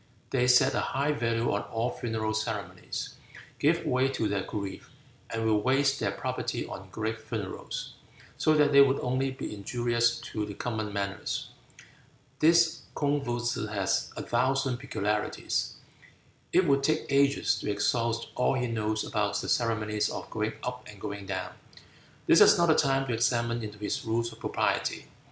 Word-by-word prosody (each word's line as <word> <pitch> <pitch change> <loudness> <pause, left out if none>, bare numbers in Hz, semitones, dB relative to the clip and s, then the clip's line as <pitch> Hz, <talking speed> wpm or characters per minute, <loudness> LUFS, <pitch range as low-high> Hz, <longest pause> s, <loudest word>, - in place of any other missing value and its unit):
They 125 -2 +2
set 125 0 +5
a - - +1
high 140 +3 0
value 115 -4 0
on 100 - 0
all 115 +4 -2
funeral 110 -3 -2
ceremonies, 105 -4 -4 0.5
give - - +2
way 130 +1 +2
to 125 -5 -1
their 100 -1 0
grief, 100 -1 -6 0.4
and 115 0 -2
will 110 -1 +3
waste 135 +3 +2
their - - 0
property - - -3
on 95 0 -8
great 110 +2 -3
funerals, 110 -4 -5 0.4
so 155 - +3
that 150 -1 +4
they 140 0 +8
would 140 0 +4
only 130 +2 0
be 130 -4 -6
injurious 120 +3 +1
to 110 - -2
the 105 -1 -6
common 110 -3 -3
manners. 100 0 -3 0.9
This 165 +1 +4
Kung 145 0 +1
Footsze 120 -3 -2
has 100 -2 0
a - - -3
thousand 130 +1 +1
peculiarities. 105 -2 -2 0.8
It 185 +1 +4
would 140 -3 +3
take 155 +2 +1
ages 140 0 +3
to - - -4
exhaust 115 +3 0
all 125 - +2
he 125 -1 0
knows 110 -2 -1
about 105 -2 -1
the - - -4
ceremonies 110 -3 +1
of - - -6
going 110 0 -1
up 125 0 -4
and 105 -1 -12
going 100 -1 -6
down. 100 - -3 0.7
This - - +6
is - - +8
not 170 - +4
the - - +7
time 135 -1 +2
to 125 - -2
examine 115 0 +1
into 105 -1 -7
his 105 0 -3
rules 115 +1 -1
of 115 - -15
propriety. - - -1
115 Hz, 165 wpm, -29 LUFS, 105-130 Hz, 0.9 s, they